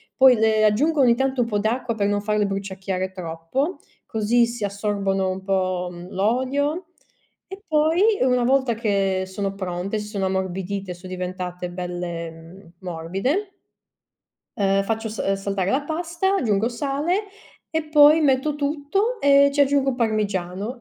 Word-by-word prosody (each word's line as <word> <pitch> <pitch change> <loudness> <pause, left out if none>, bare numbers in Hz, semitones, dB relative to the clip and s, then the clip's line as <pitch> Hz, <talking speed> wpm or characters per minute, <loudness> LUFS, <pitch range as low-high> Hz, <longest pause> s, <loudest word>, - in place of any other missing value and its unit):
poi 260 -2 +7
le 220 -1 +3
aggiungo 280 +9 +3
ogni 235 -2 +5
tanto 265 0 0
un 230 - 0
po' 210 -3 0
d'acqua 230 +2 -1
per 200 -2 0
non 205 0 0
farle 210 0 +1
bruciacchiare 190 -1 -3
troppo, 180 - -3 0.3
così 225 +2 +2
si 235 -2 -6
assorbono 200 -1 -1
un 190 0 -4
po', 185 -2 0
mhmm, 175 +1 -10
l'olio 260 - 0 0.6
e 385 +1 -9
poi 330 +8 +3
una 250 -1 +3
volta 260 -2 +2
che 195 -4 0
sono 195 +1 -3
pronte, 190 +2 -3
si 210 - -6
sono 200 -3 -2
ammorbidite, 190 0 -3
son 180 +1 -11
diventate 180 -1 -5
belle, 175 -2 -5
mhmm, 165 +2 -14
morbide 195 - -2 1.1
uhm, 195 -1 +2
faccio 225 +1 -2
sa 195 -2 -1
saltare 195 -1 -2
la 275 +3 +2
pasta, 340 +5 -1
aggiungo 220 - +1
sale 290 - -1 0.5
e 320 -1 0
poi 300 +1 +7
metto 285 0 +2
tutto 300 +11 -1
e 280 0 +6
ci 285 - +3
aggiungo 275 -2 +2
parmigiano 210 -1 -2
210 Hz, 145 wpm, -23 LUFS, 190-275 Hz, 1.1 s, poi